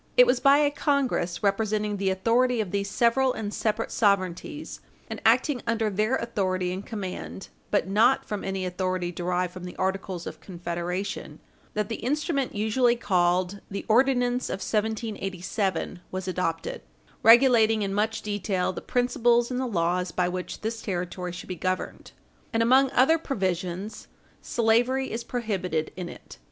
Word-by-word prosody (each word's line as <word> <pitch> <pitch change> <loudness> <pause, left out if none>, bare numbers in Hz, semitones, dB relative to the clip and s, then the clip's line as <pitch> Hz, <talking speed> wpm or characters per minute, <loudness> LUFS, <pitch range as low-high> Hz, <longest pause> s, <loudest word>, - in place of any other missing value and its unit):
It 250 - +9
was 245 0 +2
by 275 +2 +6
a 290 -1 +3
Congress, 275 - 0
representing 210 +1 0
the 195 -1 0
authority 235 +6 +2
of 205 -5 -2
these 200 0 -1
several 250 +4 +3
and 210 -1 -4
separate 220 +1 -1
sovereignties 200 - 0 0.3
and - - -5
acting 285 -6 +3
under 225 -2 +1
their 215 +6 +1
authority 185 -5 -1
and 190 +2 -5
command 195 -2 -6 0.2
(but 205 - +1
not 225 +7 +3
from 210 -2 -4
any 190 -1 -2
authority 180 -1 -2
derived 180 +1 -1
from 185 - -9
the 180 - -7
Articles 190 -2 -2
of - - -8
Confederation), 175 +2 -4 0.4
that 210 -1 0
the 225 - -4
instrument 280 -1 -1
usually 235 +4 +2
called 185 -2 +1
the 200 - -5
Ordinance 245 +1 +2
of - - -1
1787 200 -4 -2
was 185 0 -5
adopted, 170 -3 -2 0.4
regulating 225 -2 +6
in 195 -1 -2
much 220 +2 0
detail 200 -3 -1
the - - -6
principles 240 -1 +2
and 250 - -1
the 260 - -1
laws 180 -3 0
by 180 +1 +1
which 180 0 -5
this 225 +1 -3
territory 180 -1 -3
should 180 - -8
be 185 - -4
governed; 185 +2 -3 0.4
and, 225 -1 +2
among 260 +3 +5
other 320 +6 +4
provisions, 190 - -3 0.3
slavery 245 +3 +1
is 230 +1 -3
prohibited 190 -10 -2
in 180 -2 -5
it. - - -12
205 Hz, 155 wpm, -26 LUFS, 185-235 Hz, 0.4 s, It